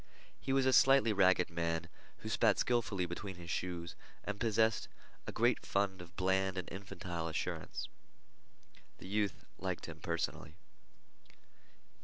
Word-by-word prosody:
He 135 - -3
was 135 0 +3
a 130 - +4
slightly 135 -3 +6
ragged 95 -3 +4
man, 85 0 -1 0.4
who - - -4
spat - - +3
skillfully 110 -6 +1
between 95 +3 -5
his 85 -1 -7
shoes 85 -1 -3 0.3
and 105 0 -4
possessed 110 0 +2 0.4
a - - -2
great 120 +1 +2
fund 100 -2 0
of 85 0 -13
bland 95 +1 +1
and 90 - -3
infantile 90 -3 -5
assurance. 80 - -3 1.1
The - - -10
youth 100 -1 -1
liked - - -3
him - - -8
personally. 80 -3 -3
95 Hz, 135 wpm, -35 LUFS, 85-105 Hz, 1.1 s, slightly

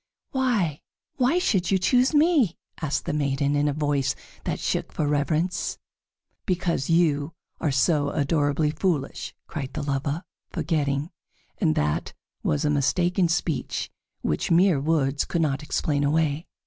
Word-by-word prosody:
"Why, 225 - 0 0.4
why 265 +5 +3
should 195 - +1
you 195 - +4
choose 250 +7 +3
me?" 295 - +3 0.2
asked 150 -3 -1
the - - -2
maiden, 140 -1 +1
in 145 +1 +2
a - - +2
voice 145 -2 0 0.3
that - - -1
shook - - -1
for 150 - -1
reverence. 155 +5 0 0.7
"Because 175 -6 0
you 160 -3 +2 0.3
are 160 - 0
so 145 +2 +2
adorably 145 +1 +1
foolish!" 155 -4 -2
cried 140 -3 -5
the 150 - -3
lover, 145 +4 -1 0.3
forgetting, 150 -2 -1 0.5
and 80 - +2
that 75 0 -1 0.3
was 150 +1 0
a 150 - +2
mistaken 175 +6 +2
speech, 165 -2 -1 0.3
which 75 - -1
mere 175 -2 +4
words 145 -2 +1
could 170 - 0
not 140 -3 0
explain 145 -1 0
away. 155 +2 +1
150 Hz, 140 wpm, -25 LUFS, 145-175 Hz, 0.7 s, you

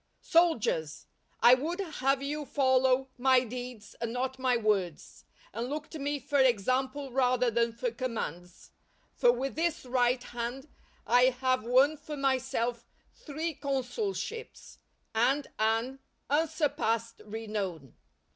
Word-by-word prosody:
Soldiers! 220 - +2 0.4
I 240 - +8
would 315 +8 0
have 275 -7 0
you 295 +2 -3
follow 260 -1 +2
my 260 0 +5
deeds 245 -2 -7
and 235 -1 -2
not 260 +2 -3
my 255 -1 +2
words, 200 -7 -2 0.3
and 230 +4 -3
look 300 +1 -5
to 315 - -7
me 290 +1 -1
for 285 0 0
example 260 +3 +1
rather 250 -1 +2
than 235 +1 +1
for 235 +1 -3
commands; 200 - -5 0.4
for - - +4
with 270 - -3
this 330 -2 -1
right 250 0 +1
hand 240 +4 -5 0.4
I 245 +1 +5
have 255 -1 +1
won 265 +6 +4
for 300 0 -7
myself 255 -3 -1 0.3
three 315 +2 -4
consulships, 295 - -4 0.3
and 265 +6 +2
an 225 +5 0 0.3
unsurpassed 285 -7 0
renown. 205 - -5
255 Hz, 125 wpm, -30 LUFS, 235-280 Hz, 0.4 s, I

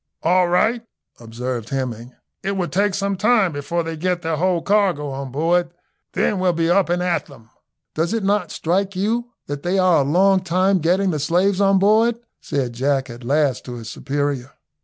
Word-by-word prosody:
"All 180 +2 +3
right," 220 +7 +2 0.4
observed 120 0 -5
Hemming, 125 -2 -4 0.3
"it 195 - -2
will 180 -2 -1
take 200 +1 +1
some 200 0 -1
time 210 -1 +3
before 160 +4 -2
they 165 0 -5
get 180 +2 -2
their 160 -1 -1
whole 180 0 +1
cargo 195 -8 +1
on 135 -1 -6
board, 170 +5 +1 0.4
then 200 - 0
we'll 185 -1 +2
be 165 0 +1
up 190 -1 +3
and 175 +1 0
at 180 -1 -1
them." 115 -5 -17 0.4
"Does 165 +3 -1
it 225 -2 -1
not 200 -2 +1
strike 190 +4 -1
you 230 +5 -1 0.2
that 145 0 -5
they 180 +4 0
are 185 -5 +4
a - - +2
long 190 +7 +3
time 185 +2 +1
getting 185 +4 +1
the 155 - -2
slaves 180 +6 +1
on 195 0 +4
board?" 220 +4 +3 0.3
said 135 -5 -2
Jack 135 +1 -1
at 120 +1 -11
last 140 +1 +1
to 125 - -7
his 115 -2 -8
superior. 140 -2 -3
175 Hz, 190 wpm, -21 LUFS, 140-195 Hz, 0.4 s, are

